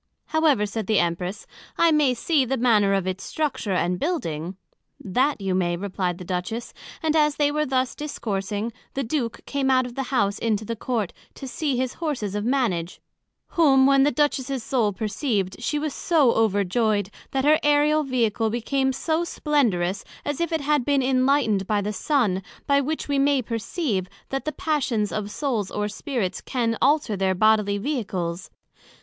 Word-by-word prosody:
However, 305 -9 +2
said 210 -1 -4
the 215 - +2
Empress, 180 +3 -1 0.3
I 335 -1 +5
may 295 -5 +3
see 295 +3 +2
the 265 +1 -1
manner 215 -5 +3
of 195 -2 0
its 185 +1 -3
structure 285 -10 -2
and 180 0 0
building. 180 - -2 0.4
That 255 +9 0
you 195 -2 -1
may, 175 -2 +1
replied 185 -2 -2
the 180 - -9
Duchess, 185 +6 -4 0.3
and 315 0 +1
as 300 -2 +3
they 290 -1 +2
were 300 +1 0
thus 260 -1 0
discoursing, 210 -6 -3 0.2
the 275 - -1
Duke 235 -2 -3
came 275 -1 -1
out 255 -1 +4
of 245 - -7
the 270 - -3
House 205 -6 +1
into 220 -2 0
the 230 - -3
Court, 225 -4 -2 0.2
to 270 - -7
see 275 0 -1
his 255 0 -1
Horses 260 - -2
of 205 0 -2
Manage; 220 -9 0 0.5
whom 275 -6 +5
when 275 0 +5
the 280 - +5
Duchess's 275 -4 0
Soul 230 -5 +1
perceived, 210 -1 -2
she 300 +5 -1
was 295 -1 -2
so 305 -8 +3
overjoyed, 205 -1 +1 0.2
that 270 0 -1
her 305 +1 +5
Aereal 295 +1 +3
Vehicle 230 -4 0
became 265 +4 0
so 315 +5 -1
splendorous, 220 - 0 0.2
as 290 +2 -2
if 340 - -1
it 320 -2 0
had 295 -1 +2
been 280 0 +2
enlightned 255 -6 +2
by 210 -1 +1
the 205 +1 -2
Sun; 210 -6 +1 0.2
by 280 -1 +3
which 310 +3 -3
we 285 -1 +1
may 275 -2 +3
perceive, 230 - -2 0.2
that 270 0 -3
the 305 - -1
passions 260 -10 -1
of 210 -1 -3
Souls 225 -5 -2
or 210 0 -2
Spirits 210 - -3
can 235 -3 -1
alter 285 -6 +3
their 190 -1 +1
bodily 210 0 +3
Vehicles. 190 - -3
240 Hz, 175 wpm, -24 LUFS, 200-285 Hz, 0.5 s, I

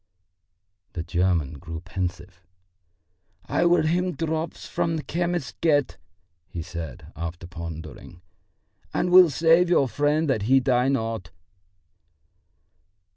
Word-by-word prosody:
The 85 - -4
German 85 -5 0
grew 80 -2 -7
pensive. 90 0 -5 1.0
"I 175 - +1
will 175 -1 +4
him 180 +3 +1
drops 160 +2 -3
from 165 -1 -1
the 155 - -5
chemist's 175 -3 -2
get," 145 -4 +2 0.5
he 85 - -6
said, 85 -7 -8
after 85 +2 -6
pondering, 85 0 -9 0.7
"and 180 - 0
will 180 -1 +8
save 165 +4 +4
your 140 -6 +4
friend 145 +5 +1
that 130 -7 +1
he 135 0 +6
die 125 -1 +2
not." 115 -9 -2
125 Hz, 115 wpm, -25 LUFS, -, 1.0 s, will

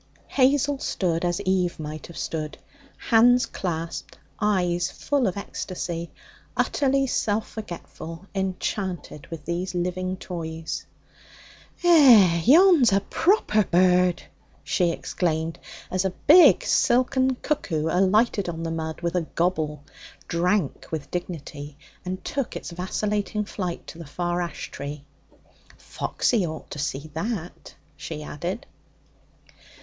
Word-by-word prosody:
Hazel 280 +1 +3
stood 170 -8 -1
as 175 +1 0
Eve 185 -3 0
might 155 0 -6
have 170 - -11
stood, 155 -2 -4 0.4
hands 245 +2 +5
clasped, 170 -2 -5 0.2
eyes 180 -4 +1
full 280 -5 0
of 190 - -2
ecstasy, 175 -4 -5 0.5
utterly 275 -1 +2
self 215 -4 0
forgetful, 175 -4 -8
enchanted 190 -5 -3
with 160 -3 -8
these 175 +2 -3
living 185 +1 -2
toys. 165 -3 -5 1.0
'Eh, 240 - +7
yon's 320 - +7
a 195 0 +3
proper 220 - +2
bird!' 180 0 +3 0.4
she 175 -2 +1
exclaimed, 165 -1 -2 0.3
as 185 0 +1
a 190 - +1 0.2
big 345 +4 +8
silken 260 +1 +2
cuckoo 190 - -2
alighted 195 +3 +2
on 165 -1 -5
the 165 - -2
mud 160 0 -4
with 170 -1 -1
a 170 -3 0
gobble, 155 -4 0 0.4
drank 180 -1 0
with 155 -3 -5
dignity, 145 -5 -6 0.3
and 185 +1 -5
took 275 -3 -3
its - - -6
vacillating 205 +4 -2
flight 180 -4 -4
to 165 - -10
a - - -8
far 175 +4 -2
ash 175 - -5
tree. 140 0 -7 0.7
'Foxy 230 -6 -1
ought 160 -2 -6
to 150 - -6
see 145 +2 -3
that,' 180 +1 -5 0.2
she 155 0 -6
added. 175 +9 -5
180 Hz, 120 wpm, -25 LUFS, 165-210 Hz, 1.0 s, big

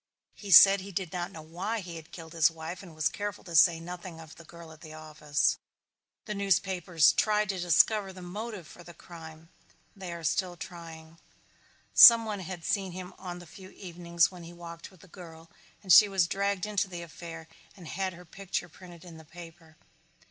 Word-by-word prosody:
He 205 - -11
said 195 +2 +8
he 200 +1 -10
did 185 -3 -5
not 175 +1 -4
know 160 -4 -11
why 185 +8 -4
he 175 -2 -9
had 160 0 -13
killed 165 -1 -11
his 165 -2 +4
wife 165 +2 -8
and 175 -5 -13
was 155 0 0
careful 205 0 -5
to 170 -2 -8
say 165 +1 +5
nothing 175 0 -9
of 160 -1 -12
the 170 - -15
girl 170 0 -13
at 160 0 -16
the 155 -2 -11
office. 155 -1 -1 0.7
The 210 - -4
newspapers 190 -5 +2
tried 210 -1 +1
to 190 -2 -3
discover 190 +4 +2
the 185 -1 -12
motive 205 +1 -7
for 175 - -14
the 175 0 -14
crime. 165 -1 -13 0.5
They 190 -3 -8
are 170 -1 -8
still 180 +2 -1
trying. 165 -2 -11 0.7
Some 230 -1 +9
one 210 -2 -4
had 180 -2 -8
seen 190 -3 -2
him 180 0 -8
on 180 -2 -7
the 175 - -12
few 185 +3 -14
evenings 170 -2 -1
when 180 -1 -12
he 170 +1 -11
walked 170 -1 -10
with 185 -4 -21
the - - -17
girl 165 -2 -14 0.3
and 185 -3 +4
she 210 - +8
was 190 -3 +2
dragged 200 +1 -2
into 205 -2 -1
the 175 -2 -8
affair 165 -1 -10 0.3
and 175 -4 -12
had 190 +1 -3
her 175 +1 -14
picture 180 0 -5
printed 175 -2 -15
in 170 -2 -12
the 160 - -13
paper. 165 -1 -14
175 Hz, 200 wpm, -28 LUFS, 165-190 Hz, 0.7 s, Some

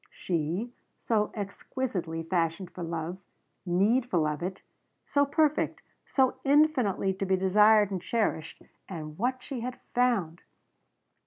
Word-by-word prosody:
She, 175 +8 -2 0.2
so 210 -2 0
exquisitely 200 -5 -4
fashioned 170 +1 -1
for 180 - -7
love 165 +2 -4 0.5
needful 195 0 +2
of 150 +1 -2
it 185 +2 -4 0.4
so 285 0 +2
perfect 305 +1 +1 0.2
so 260 -2 +2
infinitely 270 -10 +3
to 190 - -4
be 190 - +3
desired 210 +2 +5
and 185 -2 -2
cherished 215 -7 -2 0.3
and 155 -4 -6
what 255 +3 -1
she 270 -4 -5
had 245 +2 -5
found. 225 -10 +1
195 Hz, 120 wpm, -28 LUFS, 175-250 Hz, 0.5 s, desired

